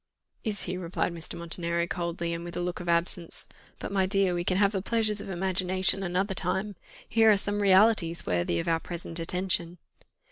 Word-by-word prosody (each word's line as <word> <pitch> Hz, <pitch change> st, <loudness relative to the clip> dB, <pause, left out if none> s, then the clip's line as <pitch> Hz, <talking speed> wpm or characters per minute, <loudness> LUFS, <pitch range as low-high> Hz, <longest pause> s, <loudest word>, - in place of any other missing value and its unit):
"Is 210 Hz, -3 st, -2 dB
he?" 180 Hz, 0 st, -3 dB
replied 175 Hz, 0 st, -2 dB
Mr. 165 Hz, -1 st, -6 dB
Montenero 170 Hz, 0 st, 0 dB
coldly, 170 Hz, -1 st, -3 dB
and 170 Hz, 0 st, -5 dB
with 175 Hz, 0 st, -7 dB
a -, -, -1 dB
look 175 Hz, 0 st, -3 dB
of 175 Hz, -1 st, -5 dB
absence. 170 Hz, 0 st, -1 dB, 0.3 s
"But, -, -, -6 dB
my 190 Hz, -1 st, +2 dB
dear, 195 Hz, -2 st, +3 dB
we 175 Hz, 0 st, -1 dB
can 185 Hz, +1 st, 0 dB
have 200 Hz, 0 st, +4 dB
the 195 Hz, -3 st, -2 dB
pleasures 215 Hz, 0 st, 0 dB
of -, -, -8 dB
the 195 Hz, -, -4 dB
imagination 185 Hz, +1 st, 0 dB
another 190 Hz, +2 st, -1 dB
time. 195 Hz, +2 st, -1 dB, 0.3 s
Here 225 Hz, -1 st, +4 dB
are 210 Hz, -, +6 dB
some 205 Hz, +1 st, 0 dB
realities 190 Hz, -3 st, +4 dB
worthy 85 Hz, -1 st, 0 dB
of -, -, -3 dB
our 165 Hz, -1 st, +2 dB
present 170 Hz, 0 st, -4 dB
attention." 180 Hz, 0 st, -1 dB
180 Hz, 200 wpm, -28 LUFS, 170-195 Hz, 0.3 s, are